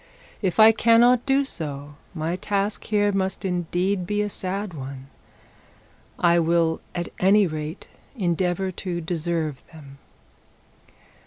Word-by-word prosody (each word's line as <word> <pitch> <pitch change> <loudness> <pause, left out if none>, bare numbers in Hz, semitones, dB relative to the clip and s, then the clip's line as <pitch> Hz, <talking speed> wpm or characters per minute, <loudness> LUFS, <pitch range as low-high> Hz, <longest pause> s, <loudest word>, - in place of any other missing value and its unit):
If 190 -1 -1
I 220 +1 +9
cannot 235 +3 +4
do 275 +1 +3
so, 145 - -6 0.2
my 160 +2 -2
task 200 +2 -2
here 205 -1 +2
must 190 -1 -2
indeed 180 +1 -1
be 210 +1 0
a 210 - -2
sad 195 0 -4
one. 135 -2 -8 1.1
I 170 -1 +4
will 165 0 +1
at 175 -1 -3
any 200 +2 +5
rate 155 -1 -5 0.3
endeavour 185 -1 0
to 175 -1 -4
deserve 165 -3 -2
them.' 140 -4 -14
180 Hz, 120 wpm, -24 LUFS, 160-205 Hz, 1.1 s, I